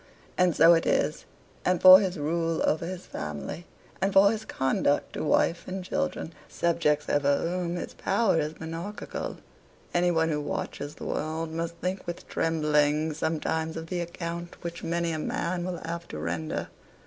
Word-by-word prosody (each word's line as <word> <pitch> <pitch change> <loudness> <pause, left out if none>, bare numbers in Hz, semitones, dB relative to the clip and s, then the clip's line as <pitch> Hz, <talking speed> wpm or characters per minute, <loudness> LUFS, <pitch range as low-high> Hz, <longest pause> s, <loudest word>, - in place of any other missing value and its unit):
And 180 -2 +3
so 165 +1 +8
it 165 - +2
is, - - +1 0.4
and 180 -1 +2
for 185 0 +11
his 190 -3 -1
rule 165 +2 0
over 160 +2 +1
his 185 0 -6
family, 75 - -6 0.3
and 195 - +2
for 200 +1 +6
his 220 -1 -4
conduct 135 +2 0
to - - -3
wife 170 +2 +2
and 185 0 -4
children 185 -4 -2 0.2
subjects 150 -3 +1
over 140 -1 +3
whom 175 0 -2
his 175 - -5
power 195 -4 +2
is 155 +1 -3
monarchical 165 +6 -5 0.6
any 175 0 +3
one 165 -1 +2
who 150 -2 0
watches 145 0 -4
the - - -8
world 160 +1 -2
must 165 +1 -3
think 185 +2 -4
with 175 - -6
trembling 150 -1 +1
sometimes 160 +1 -1
of 165 0 -7
the 180 - -2
account 170 0 -6
which 170 0 -6
many 170 0 0
a 155 - -2
man 175 +3 -2
will 180 -1 -3
have 170 +1 -5
to - - -7
render. 80 0 -3
165 Hz, 170 wpm, -27 LUFS, 155-175 Hz, 0.6 s, for